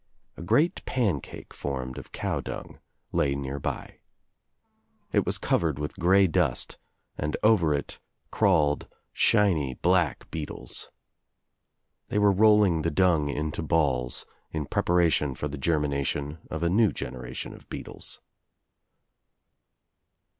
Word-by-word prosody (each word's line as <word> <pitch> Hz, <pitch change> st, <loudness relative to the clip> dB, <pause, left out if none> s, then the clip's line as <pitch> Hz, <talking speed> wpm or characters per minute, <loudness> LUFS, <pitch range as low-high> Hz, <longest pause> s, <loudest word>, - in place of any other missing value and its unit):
A -, -, -9 dB
great 150 Hz, -, +2 dB
pancake 100 Hz, -, -2 dB
formed 65 Hz, -2 st, -4 dB
of -, -, -13 dB
cow -, -, -2 dB
dung -, -, -7 dB, 0.3 s
lay 70 Hz, -1 st, +1 dB
nearby. 70 Hz, 0 st, -4 dB, 1.1 s
It -, -, +2 dB
was -, -, +2 dB
covered 80 Hz, -5 st, +1 dB
with 75 Hz, 0 st, -5 dB
grey 95 Hz, +3 st, +5 dB
dust 80 Hz, -8 st, 0 dB, 0.4 s
and 75 Hz, +1 st, -1 dB
over 105 Hz, -8 st, +4 dB
it 70 Hz, -, -5 dB, 0.3 s
crawled 75 Hz, -6 st, +2 dB, 0.3 s
shiny 85 Hz, -, +3 dB
black 90 Hz, -2 st, +1 dB
beetles. 80 Hz, -2 st, -6 dB, 1.2 s
They -, -, -2 dB
were 105 Hz, -1 st, +5 dB
rolling 105 Hz, -4 st, +5 dB
the 85 Hz, -, +1 dB
dung 80 Hz, -3 st, +3 dB
into 75 Hz, +2 st, -2 dB
balls 70 Hz, -6 st, 0 dB, 0.2 s
in 80 Hz, -2 st, -3 dB
prep -, -, -1 dB
aration 85 Hz, -6 st, +3 dB
for 75 Hz, -, -2 dB
the 75 Hz, -1 st, -6 dB
germination 75 Hz, 0 st, -1 dB
of 80 Hz, +1 st, -3 dB
a 85 Hz, -, +3 dB
new 105 Hz, +1 st, +4 dB
generation 65 Hz, 0 st, -6 dB
of -, -, -15 dB
beetles. -, -, -7 dB
80 Hz, 120 wpm, -27 LUFS, 70-90 Hz, 1.2 s, grey